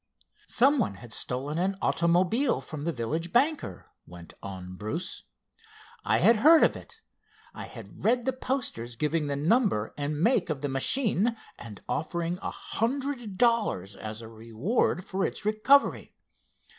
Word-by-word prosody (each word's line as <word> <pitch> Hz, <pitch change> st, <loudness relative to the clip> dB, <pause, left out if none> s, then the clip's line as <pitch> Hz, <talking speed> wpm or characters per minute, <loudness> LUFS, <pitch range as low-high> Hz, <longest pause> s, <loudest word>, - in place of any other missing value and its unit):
"Some 275 Hz, +3 st, +4 dB
one 185 Hz, -, 0 dB
had 115 Hz, +2 st, -10 dB
stolen 140 Hz, +8 st, -2 dB
an 190 Hz, +2 st, 0 dB
automobile 175 Hz, -, +2 dB
from 155 Hz, -2 st, -7 dB
the 170 Hz, -, +1 dB
village 160 Hz, +7 st, -3 dB
banker," 275 Hz, -, 0 dB, 0.2 s
went 85 Hz, -1 st, -12 dB
on 95 Hz, -1 st, -7 dB
Bruce. 110 Hz, -, -4 dB, 0.8 s
"I -, -, +2 dB
had 230 Hz, -, +5 dB
heard 315 Hz, +8 st, +7 dB
of -, -, +3 dB
it. 450 Hz, -, -13 dB, 0.5 s
I -, -, -7 dB
had -, -, -12 dB
read 240 Hz, +1 st, +2 dB
the 265 Hz, -, +1 dB
posters 235 Hz, -, -3 dB
giving 150 Hz, +3 st, 0 dB
the 140 Hz, -, -1 dB
number 160 Hz, -, +1 dB
and 145 Hz, +1 st, -2 dB
make 205 Hz, -1 st, +2 dB
of 145 Hz, -4 st, -2 dB
the 145 Hz, -, -2 dB
machine, 220 Hz, -, +1 dB, 0.2 s
and 105 Hz, -5 st, -10 dB
offering 170 Hz, +3 st, -2 dB
a -, -, -3 dB
hundred 245 Hz, -4 st, -3 dB
dollars 215 Hz, -, +1 dB
as 110 Hz, +2 st, -7 dB
a -, -, -8 dB
reward 115 Hz, -, -1 dB
for 190 Hz, 0 st, -2 dB
its -, -, -3 dB
recovery. 215 Hz, +7 st, +3 dB
170 Hz, 150 wpm, -28 LUFS, -, 0.8 s, heard